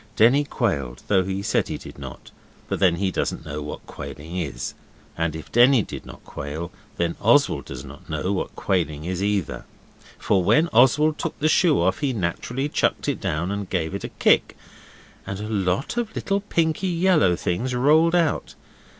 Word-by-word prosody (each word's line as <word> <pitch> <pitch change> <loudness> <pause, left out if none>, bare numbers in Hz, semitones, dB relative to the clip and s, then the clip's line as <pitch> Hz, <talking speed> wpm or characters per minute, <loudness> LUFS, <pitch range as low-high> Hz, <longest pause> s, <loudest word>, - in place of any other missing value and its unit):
Denny 135 +6 +5
quailed 70 - -2
though 95 -2 +4
he 95 +1 -3
said - - +1
he - - -4
did - - -11
not 65 -3 -9 0.4
but - - -2
then 90 -3 +4
he 95 +1 -1
doesn't 80 - -2
know 75 0 -5
what 75 - -7
quailing 80 +4 -8
is, 75 -9 -3 0.4
and 80 -1 -1
if 80 - -9
Denny 120 -1 +6
did - - -8
not - - -12
quail 80 +5 -6 0.3
then 85 -1 0
Oswald - - +3
does 65 0 -8
not 70 +4 -13
know 80 +5 -1
what 95 - -3
quailing 80 -5 -1
is 90 +1 -3
either. 100 -4 -1 0.5
For 95 -3 +1
when 160 - +4
Oswald 140 +6 +4
took - - -3
the 155 - +1
shoe 160 0 +4
off 95 +3 +1
he 140 -3 0
naturally 120 - -2
chucked - - 0
it - - -1
down 80 +5 -1
and 100 -2 -4
gave 85 -2 -1
it 100 - -4
a - - -4
kick, - - +2 0.7
and 95 0 -4
a 105 - -5
lot 100 - -1
of 230 -2 -2
little 200 0 0
pinky 170 -2 0
yellow 170 - +3
things 120 +10 -2
rolled 155 +7 +4
out. 165 -4 0
95 Hz, 185 wpm, -23 LUFS, 85-140 Hz, 0.7 s, Denny